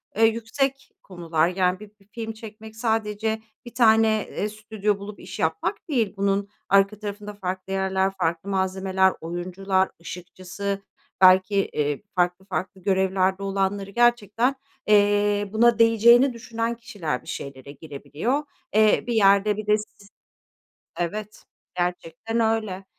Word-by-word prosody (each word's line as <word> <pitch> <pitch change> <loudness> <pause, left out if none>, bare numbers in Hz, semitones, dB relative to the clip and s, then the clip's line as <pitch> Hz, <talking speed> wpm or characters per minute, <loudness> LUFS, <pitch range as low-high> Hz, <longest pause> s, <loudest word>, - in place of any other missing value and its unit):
eee, 225 +2 +5
yüksek 235 +5 -1
konular. 170 -3 0
Yani, 185 0 0
bi 210 -1 -12
bir 195 - -26
film 225 -1 -5
çekmek 220 0 -11
sadece 220 -1 -1 0.2
1 240 - -10
tane, 225 -2 +5 0.2
eee, 210 - -3
stüdyo 215 -1 -2
bulup 205 0 -9
iş 180 - -9
yapmak 160 - -2
değil, 235 -8 0
bunun 200 0 0 0.2
arka 195 +1 +3
tarafında 205 0 -6
farklı 190 -1 -5
yerler, 190 0 +1
farklı 170 +3 -1
malzemeler, 190 0 +1
oyuncular, 185 +3 -1
ışıkçısı, 185 +3 -6 0.4
belki, 185 +2 +6
eee, 150 -7 0
farklı 180 +1 0
farklı 190 0 -4
görevlerde 190 0 +1
olanları 195 0 -1
gerçekten, 240 +2 +2 0.3
eee, 205 -1 +3
buna 235 +1 +4
değeceğini 235 +3 +6
düşünen 230 0 -3
kişiler 180 - -4
bir - - -20
şeylere 140 0 -7
girebiliyor. 160 - -3 0.3
Eee, 215 -1 +4
bir 240 - -1
yerde 205 -1 +4
bir 215 0 -6
de 210 - +4
siz 210 -1 -12 0.9
Evet, 210 +5 -4 0.3
gerçekten 180 +5 -2
öyle 215 -4 0
200 Hz, 130 wpm, -24 LUFS, 185-220 Hz, 0.9 s, belki